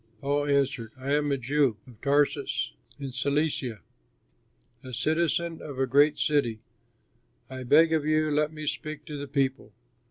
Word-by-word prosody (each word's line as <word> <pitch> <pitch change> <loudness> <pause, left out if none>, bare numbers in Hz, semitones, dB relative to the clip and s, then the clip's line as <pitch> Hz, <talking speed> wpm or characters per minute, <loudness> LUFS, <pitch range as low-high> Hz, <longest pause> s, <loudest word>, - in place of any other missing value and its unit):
Paul 145 +2 0
answered, 135 -5 0
"I 135 +2 -2
am 145 0 +1
a 140 - +1
Jew, 135 -2 +1
of 120 -4 -17
Tarsus 145 - +1 0.3
in 140 -2 -5
Cilicia, 135 - -1 1.0
a 130 -1 -9
citizen 165 +5 0
of 145 -3 -7
a 135 - +2
great 145 +3 +4
city. 130 -7 +1 0.9
I 130 0 -6
beg 160 +6 +5
of 155 -2 +2
you, 155 0 +2
let 150 +1 +1
me 155 -1 -7
speak 155 0 -4
to 150 - -7
the 145 - -5
people." 135 -1 -1
145 Hz, 155 wpm, -27 LUFS, 130-150 Hz, 1.0 s, beg